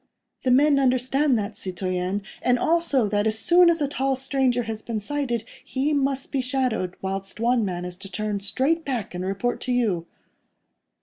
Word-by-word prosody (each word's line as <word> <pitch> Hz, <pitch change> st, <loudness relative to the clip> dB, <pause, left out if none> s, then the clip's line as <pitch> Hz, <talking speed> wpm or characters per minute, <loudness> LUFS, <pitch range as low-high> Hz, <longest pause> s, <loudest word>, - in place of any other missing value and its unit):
"The 260 Hz, -, 0 dB
men 280 Hz, +3 st, +5 dB
understand 260 Hz, +1 st, +2 dB
that, 210 Hz, 0 st, -3 dB
citoyen, 185 Hz, +1 st, -2 dB, 0.2 s
and 250 Hz, 0 st, +3 dB
also 315 Hz, -5 st, +2 dB
that, 205 Hz, +1 st, +1 dB
as 220 Hz, 0 st, 0 dB
soon 345 Hz, +9 st, +5 dB
as 330 Hz, -3 st, +2 dB
a -, -, +1 dB
tall 270 Hz, -1 st, 0 dB
stranger 260 Hz, -2 st, +1 dB
has 220 Hz, -1 st, -5 dB
been 225 Hz, -1 st, -3 dB
sighted, 240 Hz, 0 st, -2 dB, 0.2 s
he 275 Hz, +3 st, -1 dB
must 275 Hz, -1 st, 0 dB
be 275 Hz, -, 0 dB
shadowed, 250 Hz, -8 st, -1 dB
whilst 195 Hz, +1 st, -4 dB
one 235 Hz, 0 st, +2 dB
man 180 Hz, -3 st, -3 dB
is 180 Hz, 0 st, -7 dB
to 195 Hz, +1 st, -10 dB
turn 210 Hz, +2 st, -2 dB
straight 265 Hz, +12 st, 0 dB
back 245 Hz, -, -3 dB
and 180 Hz, +1 st, -4 dB
report 195 Hz, +6 st, -2 dB
to 255 Hz, -, -3 dB
you." 205 Hz, -9 st, 0 dB
245 Hz, 180 wpm, -24 LUFS, 200-270 Hz, 0.2 s, men